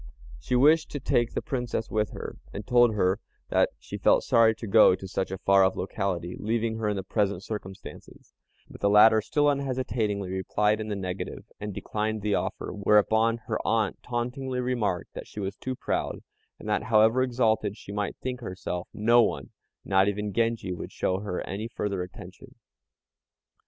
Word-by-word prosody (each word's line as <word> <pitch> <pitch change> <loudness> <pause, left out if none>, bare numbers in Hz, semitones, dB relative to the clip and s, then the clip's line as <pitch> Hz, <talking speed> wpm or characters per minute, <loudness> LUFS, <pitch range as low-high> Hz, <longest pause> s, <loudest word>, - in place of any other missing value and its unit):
She 125 - -2
wished 155 +5 +5
to 145 - -3
take 120 -2 0
the - - -1
Princess 120 -3 -3
with 105 -1 0
her, - - -7
and 100 +1 -7
told 120 -2 +4
her 95 0 +2 0.3
that - - +3
she - - -8
felt - - +4
sorry 115 -1 +4
to 115 - -8
go 105 -2 +6
to 95 +1 -9
such 95 0 -2
a 95 - -4
far 95 0 +4
off 95 0 +2
locality, 90 -3 -3
leaving 110 +1 -1
her 110 -1 -1
in 105 - -1
her 95 - -3
present 100 -1 -1
circumstances; 95 -3 -9 0.3
but - - -13
the 100 - +3
latter 110 +2 +7
still 145 +7 +1
unhesitatingly 120 -8 -1
replied 105 +3 0
in 110 - -5
the 105 - -2
negative, 95 -1 -5
and 105 0 -5
declined 110 +2 -3
the 105 -1 +1
offer; - - -2
whereupon 110 +3 +3
her - - -2
aunt 110 -3 0
tauntingly 125 +2 -3
remarked 120 -8 -1
that - - -8
she - - -9
was 100 0 -3
too 130 +3 -5
proud, - - -3 0.3
and - - -10
that, - - +1
however 110 +3 +4
exalted 110 -5 +1
she 100 - -10
might 100 -1 -2
think 125 -1 -4
herself, 90 -3 -5
no 120 +3 +5
one, 70 - -1 0.3
not 95 0 +3
even 105 0 -2
Genji, 115 -4 0
would 90 - -7
show 95 0 -1
her 100 -3 -4
any 105 +4 -4
further 100 -4 -3
attention. 90 0 -10
105 Hz, 180 wpm, -27 LUFS, 100-115 Hz, 0.3 s, latter